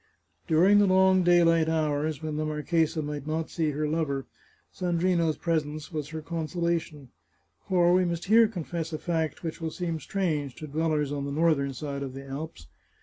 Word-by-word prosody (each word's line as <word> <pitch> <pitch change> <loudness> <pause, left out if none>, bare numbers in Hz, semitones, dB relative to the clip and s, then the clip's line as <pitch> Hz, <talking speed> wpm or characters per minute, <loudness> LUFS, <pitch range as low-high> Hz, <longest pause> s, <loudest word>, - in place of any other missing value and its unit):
During 185 +6 +5
the 205 - +4
long 190 0 +5
daylight 165 -2 +4
hours, 155 -1 -1
when 155 -1 -3
the 155 - -1
marchesa 155 +1 0
might 145 0 -5
not 160 +1 -2
see 160 -3 0
her 150 +1 -1
lover, 150 -4 -1 0.5
Sandrino's 175 -2 +1
presence 155 -2 -2
was 150 -3 -4
her 160 0 -6
conso 165 +1 -4
lation. 170 -5 -2 0.6
For 175 -1 +4
we 185 0 +4
must 170 -1 -2
here 225 +3 +6
confess 170 -5 -5
a - - -1
fact 160 -2 -2
which 165 0 -5
will 165 - -2
seem 165 -1 -3
strange 155 -8 -2
to 155 - -8
dwellers 150 -1 0
on 140 -1 -3
the 140 - -4
northern 145 -3 +1
side 140 +2 -5
of 135 -2 -5
the 135 0 -8
Alps. 135 - -7
160 Hz, 180 wpm, -27 LUFS, 150-170 Hz, 0.6 s, here